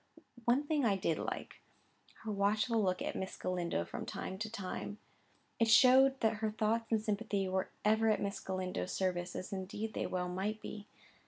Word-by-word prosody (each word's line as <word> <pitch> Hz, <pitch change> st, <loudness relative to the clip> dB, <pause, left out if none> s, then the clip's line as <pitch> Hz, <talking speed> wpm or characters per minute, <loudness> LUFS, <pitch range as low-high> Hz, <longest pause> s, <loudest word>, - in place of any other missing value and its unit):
One 255 Hz, +5 st, +3 dB
thing 295 Hz, -1 st, +1 dB
I 210 Hz, -4 st, +3 dB
did 165 Hz, -4 st, 0 dB
like—her 220 Hz, -, -8 dB
watchful 210 Hz, +3 st, +2 dB
look 185 Hz, -2 st, 0 dB
at -, -, -3 dB
Miss 190 Hz, -, -4 dB
Galindo 175 Hz, -, -1 dB
from -, -, -5 dB
time 190 Hz, -, -5 dB
to 220 Hz, +1 st, -3 dB
time: 205 Hz, -1 st, -5 dB, 0.6 s
it 230 Hz, -, +4 dB
showed 265 Hz, +3 st, +7 dB
that 220 Hz, -1 st, +2 dB
her 220 Hz, 0 st, 0 dB
thoughts 220 Hz, +1 st, 0 dB
and 220 Hz, -, +4 dB
sympathy 210 Hz, -2 st, -1 dB
were 190 Hz, 0 st, -1 dB, 0.2 s
ever 220 Hz, +1 st, +4 dB
at 215 Hz, -, +3 dB
Miss 200 Hz, 0 st, -2 dB
Galindo's 185 Hz, -1 st, -3 dB
service, 180 Hz, -1 st, -1 dB
as 185 Hz, -, -5 dB
indeed 200 Hz, +3 st, -4 dB
they -, -, -1 dB
well 180 Hz, -1 st, -1 dB
might 195 Hz, +4 st, -2 dB
be. 210 Hz, -1 st, -8 dB
210 Hz, 175 wpm, -34 LUFS, 185-225 Hz, 0.6 s, showed